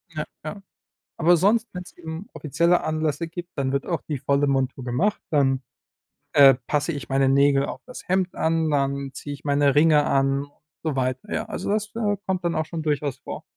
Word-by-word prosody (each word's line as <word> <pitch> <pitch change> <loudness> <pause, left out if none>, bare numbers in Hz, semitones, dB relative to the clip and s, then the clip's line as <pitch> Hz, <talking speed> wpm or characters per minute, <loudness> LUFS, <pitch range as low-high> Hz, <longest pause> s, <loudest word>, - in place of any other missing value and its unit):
Ja, 155 - -2 0.2
ja. 155 +6 -6 0.6
Aber 170 +1 +5
sonst, 220 +6 +3
wenn's 180 0 -8
eben 165 +4 -7
offizielle 170 +4 +2
Anlässe 155 +1 -1
gibt, 175 +1 -8
dann 135 -1 0
wird 140 0 -1
auch 170 -3 -2
die 150 -3 -4
volle 140 +2 +1
Montur 135 -1 0
gemacht, 125 +13 0
dann, 135 -3 +2 0.7
äh, 135 -2 +8
passe 150 +3 0
ich 145 - -6
meine 135 0 +2
Nägel 140 0 +4
auf - - -5
das 250 - -10
Hemd 185 0 0
an, 160 -1 +1
dann 140 -1 -1
ziehe 145 - -7
ich - - -13
meine 140 -1 +3
Ringe 150 -1 +5
an 135 +1 +2
und 145 - -19 0.3
so 155 -3 -1
weiter. 130 +10 -2
Ja, - - -1
also, - - -4
das, 215 0 0
äh, 210 -3 0
kommt 185 -2 -1
dann 170 - 0
auch 155 0 -1
schon 160 -1 -5
durchaus 145 -3 -1
vor. - - -7
150 Hz, 200 wpm, -24 LUFS, 140-170 Hz, 0.7 s, äh